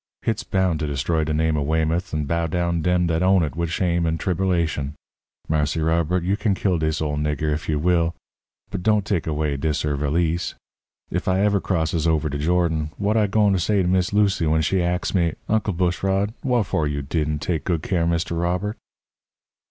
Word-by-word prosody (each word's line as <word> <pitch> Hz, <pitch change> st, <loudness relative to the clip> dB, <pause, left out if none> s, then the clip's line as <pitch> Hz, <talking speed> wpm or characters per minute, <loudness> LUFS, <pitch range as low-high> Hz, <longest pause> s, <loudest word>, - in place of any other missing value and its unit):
Hit's 110 Hz, 0 st, -1 dB
bound 95 Hz, -7 st, 0 dB
to 75 Hz, -, -2 dB
destroy 75 Hz, +3 st, 0 dB
de 75 Hz, -, -2 dB
name 80 Hz, +1 st, +1 dB
of 70 Hz, -2 st, -1 dB
Weymouth 80 Hz, +2 st, 0 dB
and 75 Hz, -2 st, -2 dB
bow 85 Hz, +1 st, 0 dB
down 85 Hz, 0 st, 0 dB
dem 90 Hz, +1 st, +2 dB
dat 80 Hz, 0 st, 0 dB
own 95 Hz, -1 st, +4 dB
it 75 Hz, -2 st, -3 dB
wid 85 Hz, 0 st, -1 dB
shame 85 Hz, 0 st, 0 dB
and 80 Hz, 0 st, -1 dB
triberlation. 85 Hz, -6 st, 0 dB, 0.5 s
Marse 75 Hz, -1 st, 0 dB
Robert, 85 Hz, +2 st, +1 dB
you 95 Hz, +3 st, +1 dB
can 105 Hz, -1 st, 0 dB
kill 95 Hz, -3 st, 0 dB
dis 80 Hz, 0 st, 0 dB
ole 75 Hz, -1 st, -2 dB
nigger 75 Hz, +1 st, 0 dB
ef 80 Hz, +2 st, -4 dB
you 75 Hz, -, +1 dB
will, 85 Hz, +1 st, +1 dB, 0.6 s
but -, -, -3 dB
don't 105 Hz, +1 st, +2 dB
take 95 Hz, -7 st, -1 dB
away 75 Hz, -2 st, -1 dB
dis 75 Hz, +1 st, -1 dB
'er' 75 Hz, -1 st, 0 dB
valise. 80 Hz, +5 st, 0 dB, 0.6 s
If -, -, -2 dB
I 95 Hz, +1 st, +2 dB
ever 100 Hz, -1 st, +2 dB
crosses 80 Hz, -2 st, 0 dB
over 80 Hz, -1 st, +1 dB
de 70 Hz, 0 st, -4 dB
Jordan, 80 Hz, -1 st, +1 dB
what 105 Hz, +2 st, 0 dB
I 110 Hz, -2 st, +3 dB
gwine 105 Hz, 0 st, +3 dB
to 95 Hz, -, +1 dB
say 100 Hz, +2 st, +2 dB
to -, -, 0 dB
Miss 90 Hz, 0 st, +1 dB
Lucy 100 Hz, -5 st, +2 dB
when 80 Hz, +1 st, +2 dB
she 95 Hz, +4 st, +1 dB
ax 90 Hz, +1 st, -1 dB
me: 85 Hz, -4 st, +1 dB
'Uncle 110 Hz, -2 st, +1 dB
Bushrod, 95 Hz, +4 st, 0 dB
wharfo' 80 Hz, -, 0 dB
didn' 75 Hz, 0 st, 0 dB
you -, -, -1 dB
take 80 Hz, +1 st, -2 dB
good 85 Hz, -4 st, -1 dB
care 90 Hz, -3 st, 0 dB
of 85 Hz, -, +1 dB
Mr. 85 Hz, 0 st, -1 dB
Robert?'" 90 Hz, +5 st, -1 dB
85 Hz, 205 wpm, -23 LUFS, 80-95 Hz, 0.6 s, own